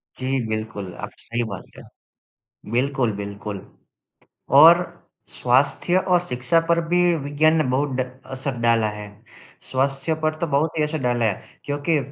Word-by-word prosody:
जी, 130 +1 -1
बिल्कुल, 110 -4 -4
आपने - - -9
सही 120 +1 -2
बात 100 - -6
कहा, - - -12 0.9
बिल्कुल, 130 -1 +1
बिल्कुल। 100 0 -6 1.0
और 165 +3 +10 0.5
स्वास्थ्य 140 +8 +1
और 180 -1 +2
शिक्षा 125 +6 +1
पर 170 0 +3
भी 175 +1 +2 0.3
विज्ञान 155 +3 +3
ने 155 - +2
बहुत 140 +3 0
ड़ 130 - -1 0.2
असर 135 0 -4
डाला 115 -2 +3
है। 105 0 -8 0.5
स्वास्थ्य 135 +4 -1
पर 155 0 +1
तो 170 - 0
बहुत 155 +3 +1
ही - - +3
असर 150 +1 -1
डाला 120 -1 +1
है 105 -4 -3
क्योंकि 145 +2 0
135 Hz, 150 wpm, -22 LUFS, 115-155 Hz, 1.0 s, और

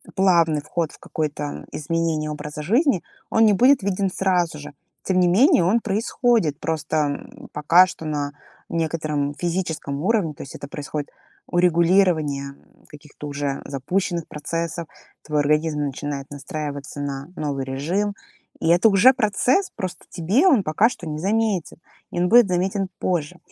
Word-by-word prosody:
плавный 170 -5 +3
вход 160 +1 -2
в - - -16
какое-то 75 - -4
изменение 155 0 -1
образа 150 0 -6
жизни, 225 - +2 0.3
он 225 - +4
не 210 - +5
будет 250 +3 +4
виден 195 0 0
сразу 180 -4 0
же. 145 0 -9 0.3
Тем 185 -1 +1
не 180 - +4
менее 225 - +5
он 220 +6 +3
происходит, 215 - +1
просто, 160 0 -2
м, 145 -2 -3
пока 165 +5 +5
что 165 -3 -8
на 145 -2 -2 0.4
некотором 155 -3 -1
физическом 165 -5 -3
уровне, 195 -6 +1
то - - -9
есть 140 - -10
это 140 - -8
происходит 145 0 -5 0.4
урегулирование, 170 -5 +2
м, - - -26
каких-то 150 0 -11
уже 140 -1 -3
запущенных 170 +5 -2
процессов, 165 +2 -4 0.4
твой 150 -1 0
организм 150 +1 +1
начинает 140 0 -4
настраиваться 145 0 -6
на 140 0 -4
новый 140 -5 -3
режим. 170 +11 -1 0.5
И - - +1
это 175 +6 +5
уже 215 +5 +6
процесс, 255 - +1
просто 185 -2 -5
тебе 200 - +2
он 265 - +4
пока 165 +7 +3
что 215 -7 -6
незаметен, 195 +4 -1 0.3
и - - -3
он 180 +1 +2
будет 240 -1 +7
заметен 190 +2 0
позже. 175 -1 -1
165 Hz, 150 wpm, -22 LUFS, 150-190 Hz, 0.5 s, будет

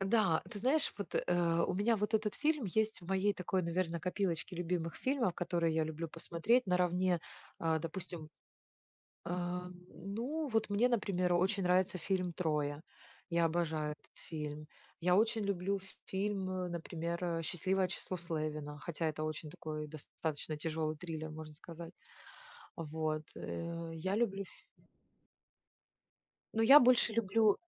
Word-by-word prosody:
Да. 195 -5 +3
Ты 210 - -6
знаешь 275 +8 +3
вот, 200 - -5
э, 170 -1 +2
у 185 - -1
меня 220 +4 +3
вот 210 +2 -1
этот 215 -1 +2
фильм 300 -3 +1
есть 220 +3 0
в 175 - -12
моей 195 +2 +3
такой 185 0 -1
наверно 170 0 0
копилочке 180 -1 -1
любимых 170 -1 -1
фильмов, 255 -8 +1
которые 170 -2 +1
я 160 -1 +2
люблю 160 +1 -4
посмотреть 175 +10 +1
наравне, 180 -1 +2 0.4
а, 160 -1 +2
допустим 165 -1 -5 1.0
А, 180 +1 -2 0.2
ну 240 - -3
вот 225 -3 +1
мне, 220 +5 +4
например, 195 -6 +1
очень 190 +3 +2
нравится 180 +1 +3
фильм 180 0 0
"Троя". 150 -3 0 0.5
Я 170 0 +3
обожаю 160 -2 0
этот 150 - -16
фильм. 150 -1 -4 0.3
Я 180 +1 +4
очень 220 +1 +3
люблю 195 0 0
ф 190 - -15 0.2
фильм, 195 -1 -1
э, 185 -1 -1
например, 170 0 -3
э, 165 -1 0
"Счастливое 185 +3 +1
число 185 +1 -3
Слевина", 155 -3 -3
хотя 165 +1 -2
это 155 0 -3
очень 155 0 -4
такой 155 0 -5
достаточно 155 0 -4
тяжелый 155 0 -1
триллер, 160 -2 -5
можно 155 0 -8
сказать. 165 +2 -9 0.8
Вот. 155 -1 -2
Э, 170 0 -4
я 185 +5 -1
люблю 195 -4 +1
фи - - -19 1.9
Ну 225 - +3
я - - +12
больше 245 -2 +5
люблю 220 -1 +4
175 Hz, 145 wpm, -35 LUFS, 160-195 Hz, 1.9 s, я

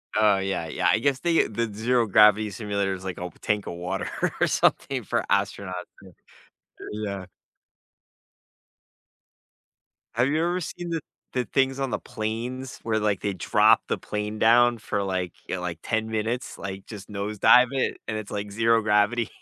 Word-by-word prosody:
Oh, 105 -2 +4
yeah, 95 -4 -2
yeah. 90 +3 0
I 105 - +4
guess 135 +1 +1
they 170 0 +2
the 110 0 -2
zero 120 +2 +2
gravity 105 +1 +5
simulator 100 -2 -2
is 95 0 -7
like 95 -1 -3
a - - -8
w 90 - -5
tank 105 -1 0
of - - -5
water 90 +3 -3 0.3
or - - +4
something - - +1
for - - -1
astronauts. 95 -2 0 0.3
Yeah, 95 - -13
eh, - - -17 0.9
yeah. 100 -2 -4 2.9
Have 120 +3 +3
you 155 +2 +1
ever 175 +1 0
seen 175 +1 -6
the 165 -2 -1 0.3
the 125 -2 0
things 135 +4 +1
on 135 - -1
the - - -1
planes 120 +3 -5
where, 110 -1 0
like, 105 -2 0
they 100 -2 -1
drop 90 - +4
the - - -1
plane 105 +1 -4
down 120 +2 +5
for, 105 -2 -2
like, 95 -2 -2 0.2
y 95 - -1
like, 90 -2 -4
10 110 0 -1
minutes, 110 +3 -3
like, 95 0 -6
just 105 -2 -10
nose 105 +1 -4
dive 125 +4 +7
it, 135 -1 -1
and 110 - -2
it's, 110 -1 -6
like, 100 0 -4
zero 115 +1 +3
gravity, 105 +3 +2
105 Hz, 175 wpm, -25 LUFS, 100-120 Hz, 2.9 s, dive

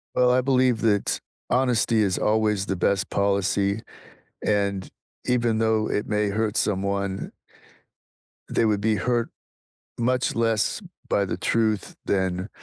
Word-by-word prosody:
Well, 125 0 +4
I 125 +1 +4
believe 130 -3 +2
that 105 -3 +1 0.3
honesty 120 -3 +2
is 95 -3 +1
always 105 -2 +1
the 95 - -2
best 95 +2 0
policy, 100 +1 +1 0.6
and 100 -2 0 0.4
even 120 -3 +1
though 110 -1 +1
it 105 - -1
may 105 -1 0
hurt 110 +1 -1
someone 100 -1 -1 1.2
they - - +2
would 105 -2 +1
be 110 0 +2
hurt 120 +1 0 0.7
much 125 +1 0
less 115 - +1 0.3
by 100 - +2
the - - -3
truth 110 -3 0
than 95 0 -1
105 Hz, 130 wpm, -24 LUFS, 100-115 Hz, 1.2 s, Well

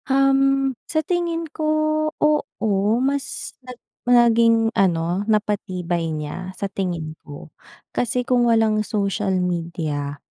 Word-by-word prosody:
Um, 275 0 +3 0.2
sa 315 -2 0
tingin 340 -1 -1
ko, 310 - -3 0.5
oo, 220 -8 +1
mas 275 +2 -2
nag 250 -1 -10 0.2
maging 230 -2 +4
ano, 175 -1 +1
napatibay 185 -5 -1
niya, 160 +5 -5
sa 200 - -3
tingin 175 -5 -3
ko. 145 +1 -11 0.4
Kasi 245 +1 -1
kung 245 -1 +3
walang 220 -2 +3
social 205 -1 -1
media, 165 -5 -2
215 Hz, 110 wpm, -22 LUFS, 180-250 Hz, 0.5 s, maging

